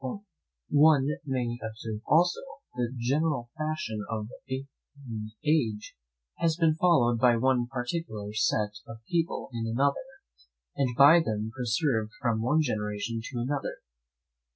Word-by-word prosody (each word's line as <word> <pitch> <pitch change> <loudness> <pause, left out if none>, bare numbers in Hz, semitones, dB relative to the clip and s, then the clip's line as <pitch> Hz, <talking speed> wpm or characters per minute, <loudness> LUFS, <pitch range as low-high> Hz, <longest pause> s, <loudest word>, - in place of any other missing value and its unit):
One 145 -2 +5 0.2
may 120 -3 -1
observe 110 -1 -6
also, 175 +4 +4 0.3
that 125 -1 -1
the - - -9
general 135 0 0
fashion 155 -9 -3
of 110 -1 -3 0.7
one 110 -5 -6 0.2
age 120 -9 0 0.4
has 165 -1 +1
been 165 -2 +3
followed 145 -9 +3
by 120 0 +5
one 125 0 +2
particular 125 -5 -4
set 105 -1 0
of 115 -1 -11
people 170 -5 -1
in 115 -1 -3
another, 140 +5 +1 0.8
and 125 -3 0
by 145 +5 +8
them 110 -6 -2
preserved 120 -2 0
from 115 -3 0
one 150 +7 +3
generation 105 -2 -2
to 120 -3 -3
another. 135 +3 -2
120 Hz, 130 wpm, -28 LUFS, 110-150 Hz, 0.8 s, by